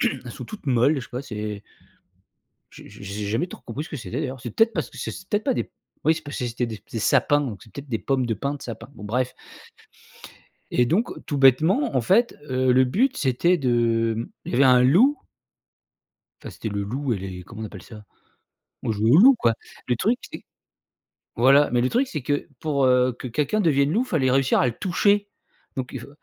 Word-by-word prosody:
elles - - -2
sont - - -8
toutes 215 -6 -10
molles, 130 +3 +3
je - - -2
sais 120 - -10
pas, 125 - -4
c'est 105 -5 -6 1.1
j'ai - - -13
j'ai 100 0 -13
j'ai 100 +1 -5
jamais 115 - -1
trop - - -11
compris 120 +6 -6
ce - - -11
que 150 - -5
c'était 110 -8 -5
d'ailleurs, 130 0 -4
c'est 120 -2 -6
peut-être 225 - +3
parce - - -2
c'est - - -5
c 185 - -10
peut 210 - +2
être 210 - -8
pas 270 - +1
des - - -3 0.3
oui 160 - +4
c 160 - -6
parce 145 -1 -7
que 125 - -2
c'était 120 +1 -2
des 110 -2 -7
des 115 - -3
sapins, 140 +5 +3
donc 115 -8 -5
c'est 110 - -19
peut-être 140 0 -9
des 115 -3 -1
pommes 135 -2 0
de 115 - -1
pins 140 +7 -3
de 145 - -9
sapins. 115 +1 -8
Bon 105 - -12
bref 125 +4 -1 1.4
et 125 - +3
donc 200 - +1 0.2
tout 145 - -2
bêtement, 150 - +4
en 130 - +3
fait, 225 - +2
heu, 130 0 +2
le 130 +1 +5
but, 245 - +1
c'était 150 +8 +2
de, 115 -4 +1
mmh, 115 - -3 0.2
il - - -5
y - - -1
avait 135 - +5
un 125 -1 +6
loup 225 - +4 1.2
enfin, - - -7
c'était 110 - -6
le 100 -1 -3
loup 130 +5 -2
et - - -3
les 95 -1 -7
comment 110 +4 -10
on - - -3
appelle 100 -4 -10
ça? 105 -2 -12 0.8
On - - 0
jouait 110 +1 +1
au 145 - +7
loup, 260 +8 +8
quoi. 115 - +2 0.3
Le 125 - +2
truc 220 - +1
c'est - - -8 0.9
voilà, 135 +5 +5
mais 120 -1 +2
le 130 - +1
truc 265 +3 +1
c'est 155 - -4
que 145 +3 -2
pour, 140 -4 +1
heu, 125 -1 +3
que 130 - -6
quelqu'un 150 - 0
devienne 145 -5 +2
loup, 225 +8 +2
fallait 145 - +1
réussir 135 0 +3
à - - +3
le 120 - -2
toucher, 205 +2 +1 0.5
donc 130 -1 -3
il - - -4
faut - - -11
130 Hz, 230 wpm, -24 LUFS, 115-155 Hz, 1.4 s, loup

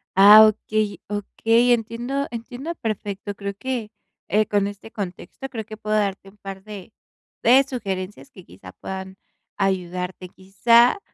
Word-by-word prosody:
Ah, 205 +3 +10
okey, 215 -1 -1
okey, 225 +4 +2
entiendo, 240 +5 -2
entiendo 245 +7 -6
perfecto, 205 -4 -4
creo 200 0 -5
que, 240 -3 -4 0.4
eh, 215 +2 +2
con 205 -1 +1
este 205 +2 -9
contexto 200 +6 -7
creo 225 -4 -5
que 215 0 -9
puedo 215 0 -2
darte 195 -1 -2
un 205 - -22
par 195 -1 -9
de, 210 -1 -10 0.5
de 255 +4 +6
sugerencias 205 -3 -5
que, 185 - -14
quizá, 90 0 -13
puedan 190 0 -7 0.4
ayudarte. 180 -2 -2
Quizá, 230 - +3
210 Hz, 140 wpm, -23 LUFS, 195-230 Hz, 0.5 s, Ah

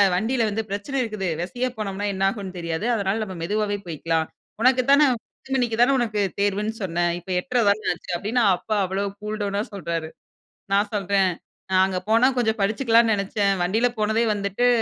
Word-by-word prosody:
வண்டியில 230 +5 +1
வந்து 220 +2 -2
பிரச்சனை 205 +8 -3
இருக்குது. 215 -5 -3
வெசையா 245 +8 -2
போனோம்னா 205 -1 -3
என்ன 190 0 -2
ஆகும்னு 195 -2 -6
தெரியாது. 170 +4 -3
அதனால 200 +1 -1
நம்ம 190 -3 -7
மெதுவாவே 205 +3 -1
போய்க்கலாம். 160 0 -1 0.3
உனக்கு 255 +1 +4
தானே 290 +2 +7
10 265 +3 -11
மணிக்கு 240 -4 0
தான 255 +3 +5
உனக்கு 215 -4 0 0.2
தேர்வுன்னு 205 +2 0
சொன்ன 175 -2 -1 0.2
இப்ப 175 - -16
8:30 250 0 0
தான 205 +2 +2
ஆச்சு 175 - -9
அப்டின்னு 225 +7 0
அப்பா 215 +4 -2
அவ்ளோ 190 +2 -2 0.2
கூல் 210 +1 -4
டவுனா 200 0 -1
சொல்றாரு. 170 -4 -3 0.6
நான் 205 +1 +2
சொல்றேன், 195 -1 +2 0.4
"நான் 185 0 +5
அங்க 190 -1 -2
போனா 230 +4 +5
கொஞ்சம் 220 -2 +1
படிச்சுக்கலாம்னு 225 +2 +3
நெனைச்சேன். 200 0 0
வண்டியில 220 +7 +2
போனதே 220 +2 +2
வந்துட்டு 200 +4 0
205 Hz, 170 wpm, -23 LUFS, 190-225 Hz, 0.6 s, தானே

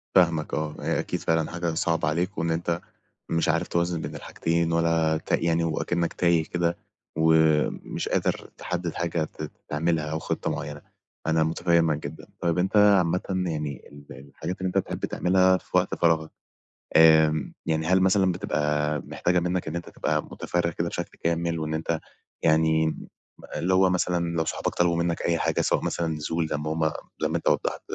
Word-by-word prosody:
فاهمك 85 -4 +3
آه، 75 0 -2
هي - - 0
أكيد - - -2
فعلًا 80 -1 0
حاجة 85 -1 -2
صعبة 80 +1 0
عليك، 85 +5 -1
وإن 85 - 0
أنت 85 +1 -1 0.5
مش 85 -1 +1
عارف 85 +3 +1
توازن 85 -1 0
بين - - -6
الحاجتين، 85 0 -1
ولا 80 -1 +2
ت - - -9
يعني 85 0 +2
وأكِنّك 85 +1 -1
تايه 85 -2 +2
كده، 85 0 -1 0.4
ومش 80 -1 +2
قادر - - -1
تحدد 90 -2 -3
حاجة 85 -1 -1
ت - - -7 0.2
تعملها 80 +1 0
أو 80 - -1
خطة - - -2
معينة، 75 0 -5 0.5
أنا 80 0 +3
متفهمك 80 -1 +2
جدًا. - - -11
طيب 85 0 0
أنت 95 +4 +1
عامةً 95 -4 +5
يعني، 80 -7 -3
ال 70 0 -14 0.2
الحاجات 85 +6 -5
اللي 95 - 0
أنت 90 - -1
بتحب 95 - -1
تعملها 95 0 +3
في - - -2
وقت - - +1
فراغك، 80 -2 +2 0.6
آمم، 80 -1 +5
يعني 80 0 0
هل 95 +2 +4
مثلًا 95 0 +4
بتبقى 75 -3 0
محتاجة 90 0 +1
منك 90 0 -1
إن 80 - -4
أنت 85 - -5
تبقى 75 0 -1
متفرغ 85 -1 -2
كده 85 +1 -2
بشكل 85 - -5
كامل، 85 0 0
وإن 80 0 -3
أنت 80 +1 -1 0.4
يعني 80 0 +3
م 80 - -5 0.5
اللي 95 +2 0
هو 95 0 +5
مثلًا 85 -2 0
لو 80 - +1
صحابك - - -2
طلبوا 90 -1 +2
منك 85 0 0
أي 85 - +1
حاجة، - - 0
سواء - - +1
مثلًا 85 - -1
نزول، 80 +1 -2
زي 75 - -2
ما 75 +1 -3
هُم 80 -1 +1 0.3
زي - - +2
ما - - -1
أنت - - -5
وضّحت، - - 0
85 Hz, 180 wpm, -26 LUFS, 80-85 Hz, 0.6 s, عامةً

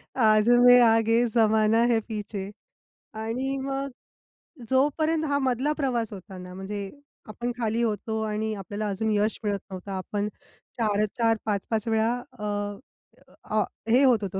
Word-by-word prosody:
आज 215 -2 +4 0.2
मै 245 0 +9
आगे 225 0 +4
जमाना 220 0 +4
है 230 - +3
पीछे. 205 -3 -5 0.6
आणि 240 +5 -3
मग 275 +1 -3 0.8
जोपर्यंत 310 +4 +2
हा 285 -1 +1
मधला 265 +2 +1
प्रवास 240 -7 -1
होता 190 -1 -10
ना, 180 0 -9
म्हणजे 195 +1 -5 0.4
आपण 240 +3 -3
खाली 230 -1 0
होतो 220 0 -2
आणि 215 0 -2
आपल्याला 205 +2 -4
अजून 215 +3 -1
यश 210 +1 +1
मिळत 205 -2 -1
नव्हतं. 190 +1 -7
आपण 205 +2 -3 0.5
4-4, 220 +1 +1
5-5 215 +1 -1
वेळा 225 0 +2 0.3
अ, 210 - -4 1.1
अ, 215 - +4 0.3
हे 250 +5 +5
होत 245 -6 +4
होतो, 190 -1 -3
220 Hz, 140 wpm, -26 LUFS, 210-245 Hz, 1.1 s, मै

